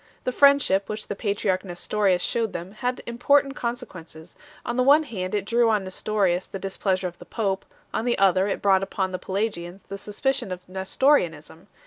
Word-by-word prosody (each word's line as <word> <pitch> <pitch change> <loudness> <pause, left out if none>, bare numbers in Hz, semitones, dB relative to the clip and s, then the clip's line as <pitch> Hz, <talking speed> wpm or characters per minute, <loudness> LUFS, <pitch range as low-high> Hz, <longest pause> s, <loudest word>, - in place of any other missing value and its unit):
The 255 - -1
friendship 280 -8 +4
which 215 0 -4
the 205 - -2
patriarch 200 -2 -1
Nestorius 185 0 0
shewed 225 -3 -1
them 175 +2 -6
had 250 +4 -3
important 275 +4 +2
con 235 -3 -2
sequences; 170 -8 -12 0.3
on 240 - -2
the 255 - +2
one 285 +5 +6
hand 190 -8 -4
it 200 -2 -1
drew 235 +2 +3
on 210 -3 +2
Nestorius 185 -1 0
the - - -6
displeasure 190 -1 -1
of 175 - -10
the - - -11
pope, 195 -4 -2 0.3
on 225 - -1
the 240 - +1
other 190 0 +4
it 200 - -3
brought 195 -1 +4
upon 190 -1 -2
the 185 - -4
Pelagians 190 -2 -3
the 200 - -6
suspicion 245 +2 -2
of 180 0 -7
Nestorianism. 185 - 0
200 Hz, 185 wpm, -25 LUFS, 185-235 Hz, 0.3 s, one